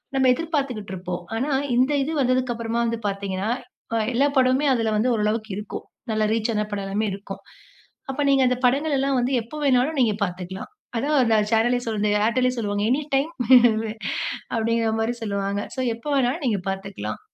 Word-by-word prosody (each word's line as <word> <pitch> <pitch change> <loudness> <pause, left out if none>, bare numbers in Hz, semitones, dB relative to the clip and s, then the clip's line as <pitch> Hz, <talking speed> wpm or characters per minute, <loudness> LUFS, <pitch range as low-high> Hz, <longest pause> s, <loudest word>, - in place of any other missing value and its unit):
நம்ம 265 -1 +3
எதிர்பார்த்துக்கிட்டு 265 - -3
இருப்போம். 180 -1 -5
ஆனா, 265 +6 -1 0.2
இந்த 255 +4 +3
இது 305 - -3
வந்ததற்கு 255 -1 +1
அப்புறமா 230 0 -2
வந்து 230 0 -1
பார்த்தீங்கன்னா, 195 +1 -2 0.5
அ - - +2 0.2
எல்லா 270 +4 +3
படமுமே 260 +3 +3
அதில 225 -2 0
வந்து 240 +4 +2
ஓரளவுக்கு 215 +1 -1
இருக்கும். 210 - -6 0.3
நல்லா 215 0 +1
ரீச் 225 +1 0
ஆன 210 0 0
படம் 200 -1 -3
எல்லாமே 205 +3 -1
இருக்கும். 195 0 -8 0.7
அப்ப 280 +2 -3
நீங்க 275 -1 +4
அந்த 250 - +2
படங்கள் 285 +4 +2
எல்லாம் 275 0 +1
வந்து 245 +2 0
எப்போ 230 +7 -11
வேணாலும் 270 +2 +2
நீங்க 225 -4 +3
பார்த்துக்லாம். 180 +1 -7 0.3
அதுதான் 280 +3 +2
அந்த 225 -2 +3
சேனலே 235 +2 +3
சொல்வாங்க 210 -2 0 0.2
ஏர்டெல்லே 250 +2 +2
சொல்லுவாங்க. 205 -2 -1
எனி 275 +4 +2
டைம் 290 +5 +1 1.2
அப்பிடிங்கமாரி 225 0 0
சொல்லுவாங்க. 200 -1 -1
சோ, - - -5 0.2
எப்போ 235 +6 -7
வேணாலும் 270 +4 +1
நீங்க 210 -5 +1
பார்த்துக்லாம். 195 - -5
230 Hz, 165 wpm, -23 LUFS, 205-260 Hz, 1.2 s, நீங்க